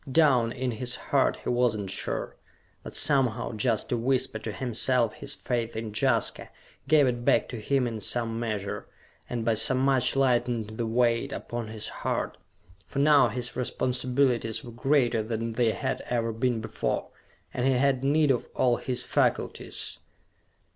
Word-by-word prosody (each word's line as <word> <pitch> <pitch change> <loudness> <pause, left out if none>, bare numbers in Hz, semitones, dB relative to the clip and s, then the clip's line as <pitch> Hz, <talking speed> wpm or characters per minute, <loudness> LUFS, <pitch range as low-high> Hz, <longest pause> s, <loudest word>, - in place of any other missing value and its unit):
Down 130 -6 +4
in 125 0 -2
his 120 +2 -2
heart - - +1
he - - -2
was 120 -2 +2
not 100 -2 -4
sure. 100 - -3 0.5
But - - -9
somehow, 130 -5 +2
just 110 0 0
to 120 - 0
whisper 130 -1 0
to 110 - -5
himself 120 0 +1
his 140 +1 -6
faith 120 -5 -2
in 110 -1 -4
Jaska, 105 - +1 0.4
gave 150 0 +5
it 120 -2 -1
back - - +3
to 120 - -5
him 135 +3 +1
in 115 -3 -4
some 115 +1 -1
measure, 105 -4 -3 0.4
and 115 -2 -3
by 115 - +3
so 130 +4 +3
much 130 0 +2
lightened 120 -4 +1
the 115 - 0
weight 120 +3 +1
upon 120 -4 -5
his 110 -1 -3
heart. - - -3 0.5
For - - -8
now 145 -2 +6
his 120 +2 -4
responsibilities 125 -2 0
were 120 - -9
greater 120 -1 +2
than 115 +1 -3
they 115 0 +2
had - - -2
ever 115 -1 0
been 120 0 0
before, 110 - -2 0.4
and 125 +1 0
he 135 - +4
had 135 0 +2
need 145 +1 +3
of 125 - -1
all 125 -2 +3
his 125 -1 -3
faculties. 125 - -1
120 Hz, 165 wpm, -27 LUFS, 115-130 Hz, 0.5 s, now